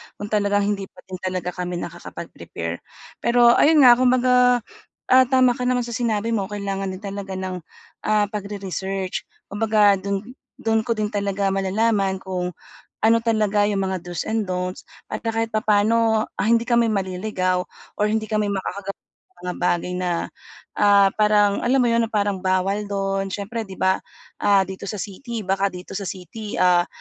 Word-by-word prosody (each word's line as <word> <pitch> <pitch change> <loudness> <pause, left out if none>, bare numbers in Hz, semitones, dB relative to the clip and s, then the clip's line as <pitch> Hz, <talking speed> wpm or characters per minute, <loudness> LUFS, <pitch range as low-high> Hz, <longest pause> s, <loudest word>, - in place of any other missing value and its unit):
Kung 205 +1 -7
talagang 205 -1 +2
hindi 200 -1 -1
pa - - -18
din 185 -1 -8
talaga 185 -1 -3
kami 180 0 -4
nakakapag-prepare. 85 - -6 0.4
Pero 235 0 +5
ayun 305 -1 +6
nga, 250 - +10
kung 255 - +4
baga 250 -1 +4 0.6
tama 255 -1 +4
ka 250 +1 -2
naman 250 -1 +1
sa 235 - -6
sinabi 230 -1 -1
mo, 200 -4 0
kailangan 195 -1 -3
din 185 +2 -6
talaga 200 -1 -5
ng, 185 -1 -4 0.5
ah, 210 -1 +2
pagre-research. 195 -2 -4 0.2
Kumbaga 205 -1 +3
do'n, 200 +1 -2 0.3
do'n 225 0 0
ko 230 - +1
din 215 -1 -2
talaga 200 -1 0
malalaman 195 +1 +1
kung 180 -2 -3 0.5
ano 225 +1 +5
talaga 215 -3 +2
yung 195 -1 0
mga 190 -1 -1
do's 175 -2 -4
and 220 -1 -1
dont's 180 0 -3 0.2
at 215 - -5
kahit 225 0 -2
papaano, 215 +1 +3
ah, - - -1
hindi 235 0 +3
kami 235 -2 +3
maliligaw 185 -2 -1 0.3
or 210 - +1
hindi 220 0 0
kami 215 -1 0
makakagawa 195 0 -4
ng 375 - -38
mga 180 0 -3
bagay 175 0 0
na, 180 -1 -1 0.7
ah, 200 -1 +5
parang 210 -1 +4
alam 260 +2 +3
mo - - +3
'yon, 230 0 +2
parang 205 -3 0
bawal 190 +2 0
do'n. 195 -1 -1
Siyempre 210 +4 -4
'di 190 - -9
ba, 190 0 +2 0.4
ah, 200 -1 +5
dito 190 +1 -7
sa 210 +1 -4
city 225 +3 -6
baka 195 +1 +1
dito 180 0 -9
sa 200 - -5
city, 205 +5 -7
ah, 180 -1 +4
205 Hz, 165 wpm, -22 LUFS, 190-220 Hz, 0.7 s, nga